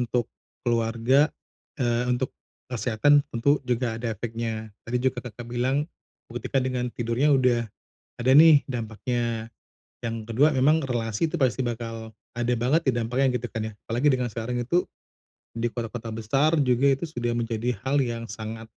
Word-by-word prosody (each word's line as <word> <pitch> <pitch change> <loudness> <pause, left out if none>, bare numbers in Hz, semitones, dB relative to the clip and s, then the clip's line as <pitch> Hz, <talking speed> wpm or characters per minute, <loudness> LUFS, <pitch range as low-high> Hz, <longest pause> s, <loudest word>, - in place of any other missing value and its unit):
untuk 120 -1 0 0.4
keluarga, 120 +4 +3 0.5
eee, 120 -2 +1
untuk 125 +1 0 0.4
kesehatan 125 +5 +3
tentu, 140 +5 +2
juga 120 -2 0
ada 115 -1 -2
efeknya. 115 0 -4 0.2
Tadi 120 - -1
juga 130 0 0
Kakak, 120 -1 -9
bilang 125 +4 0 0.5
buktikan 125 +2 -1
dengan 125 -1 -1
tidurnya 120 +5 +2
udah 125 -3 +2 0.5
ada 125 +2 +2
nih 155 -2 +8
dampaknya. 115 -1 -2 0.5
Yang 115 -1 -3 0.2
kedua 145 +7 +5
memang 150 +5 +4
relasi 115 +3 0
itu 175 - -3
pasti 130 -2 +1
bakal 115 -2 -5 0.2
ada 120 +1 0
banget 135 +7 +1
di - - +5
dampaknya 120 +3 +1
gitu 120 - -6
kan 110 -1 -2
ya. 110 - -12
Apalagi, 120 +6 +1
dengan 125 -2 +1
sekarang 115 +3 -3
itu 175 +9 +2 0.7
di 115 0 -1
kota-kota 115 -1 -5
besar 135 +9 +2
juga 135 +1 +3
itu 170 - -4
sudah 120 -4 -2
menjadi 115 0 -1
hal 140 +2 +2
yang 115 -2 -3
sangat 110 0 -6
120 Hz, 155 wpm, -26 LUFS, 115-130 Hz, 0.7 s, nih